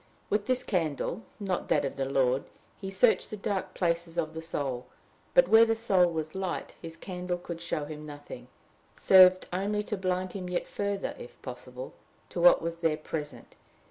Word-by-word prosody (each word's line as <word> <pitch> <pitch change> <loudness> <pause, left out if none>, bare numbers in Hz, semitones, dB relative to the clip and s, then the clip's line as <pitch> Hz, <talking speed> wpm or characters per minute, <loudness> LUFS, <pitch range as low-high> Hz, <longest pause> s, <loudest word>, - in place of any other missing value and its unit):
With 210 0 +1
this 255 0 +1
candle, 170 +1 -1 0.2
not 190 -3 -2
that - - +2
of 135 - -3
the 135 - -1
Lord, 135 -1 +2 0.3
he 195 - -6
searched 210 +5 +3
the 215 - -6
dark 195 -2 -3
places 170 -1 -1
of 155 0 -1
the 160 - -5
soul; 135 -6 -3 0.5
but, - - +7
where 225 +1 +8
the 225 0 +2
soul 190 -6 +3
was 155 -1 -4
light, 190 -2 -3
his 165 -1 -8
candle 180 -1 -4
could 170 -1 -7
show 160 -3 -2
him 150 0 -8
nothing 145 -1 -9 0.5
served 185 -1 +7
only 205 +3 0
to 210 - -3
blind 185 -1 -1
him 185 -2 -5
yet 180 - -2
further, 200 -1 -2
if 120 - -11
possible, 125 0 -8 0.4
to 175 - -3
what 175 -1 +7
was 170 0 -3
there 165 -2 +1
present. 155 -1 -6
175 Hz, 180 wpm, -29 LUFS, 155-195 Hz, 0.5 s, where